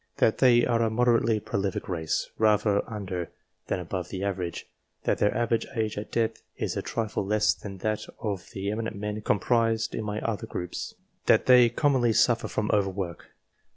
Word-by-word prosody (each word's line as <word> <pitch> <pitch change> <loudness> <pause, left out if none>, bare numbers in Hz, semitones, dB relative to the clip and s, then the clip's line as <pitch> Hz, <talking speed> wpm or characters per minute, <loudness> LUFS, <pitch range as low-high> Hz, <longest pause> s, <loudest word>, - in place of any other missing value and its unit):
That 110 - +3
they 120 -2 +6
are 115 -2 +2
a 115 - +2
moderately 115 -1 +3
prolific 100 -2 -2
race, 80 -4 -2
rather 105 -1 +3
under, 95 -5 -4 0.4
than - - -1
above 90 +1 -4
the 95 0 -4
average. 90 -3 -3 0.4
That - - +1
their 105 - +3
average 115 -1 0
age 110 -2 -1
at 105 - -6
death 115 -1 0 0.2
is - - -2
a - - -1
trifle 110 -3 -2
less 105 +1 +2
than 100 -2 -9
that 110 -1 -1
of 100 -5 -4
the 100 +1 -3
eminent 110 0 -3
men 105 +1 -4
comprised 115 +2 +1
in - - -3
my 105 0 -3
other 110 -4 -3
groups. 90 -1 -5 0.3
That - - +5
they 125 -2 +7
commonly 125 -2 +2
suffer - - +3
from - - -1
over 100 -2 +3
work. 90 -3 -5
105 Hz, 180 wpm, -27 LUFS, 100-115 Hz, 0.4 s, they